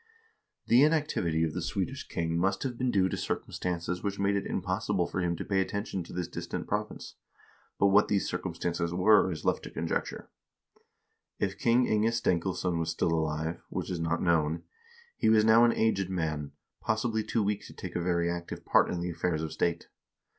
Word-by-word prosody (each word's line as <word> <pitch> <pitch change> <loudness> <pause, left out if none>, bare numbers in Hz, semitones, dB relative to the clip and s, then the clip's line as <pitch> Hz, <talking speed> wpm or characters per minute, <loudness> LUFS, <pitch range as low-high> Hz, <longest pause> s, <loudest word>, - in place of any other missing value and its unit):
The 120 +3 +5
inactivity 145 - +2
of 80 -1 -1
the - - -3
Swedish - - -3
king 80 0 -2
must 95 +3 +1
have 130 -3 -3
been 125 +1 0
due 95 -5 +3
to - - -2
circumstances 90 0 -3
which 100 -1 -2
made 100 0 +1
it 100 - -1
impossible 95 0 -1
for 95 - -3
him 85 -1 0
to - - -6
pay 95 -1 +1
attention 100 -1 -3
to - - -12
this 90 -1 -3
distant - - -5
province, - - -4 0.6
but 100 - +4
what 105 +2 +5
these 100 -2 +1
circumstances 85 0 -2
were 95 +1 +5
is 80 -2 -6
left - - +1
to - - -6
conjecture. - - -3 1.1
If 100 -1 -2
King 120 +2 +4
Inge 110 +2 +2
Stenkilsson 90 -4 0
was 80 0 -1
still 80 0 0
alive, 80 +1 -1
which - - -4
is 90 - -2
not 85 0 -1
known, 80 -2 +1 0.5
he - - +2
was 110 -1 +5
now 115 +2 +7
an 115 - +3
aged 100 -4 +1
man, 75 -5 -2 0.3
possibly 110 0 0
too 110 +1 0
weak 100 0 -2
to - - -12
take - - -7
a 85 - 0
very 85 -1 +1
active 85 0 -5
part - - +4
in 90 - -2
the 90 0 -2
affairs 85 -1 -1
of 80 - -4
state. 85 -1 -1
90 Hz, 190 wpm, -29 LUFS, 85-105 Hz, 1.1 s, now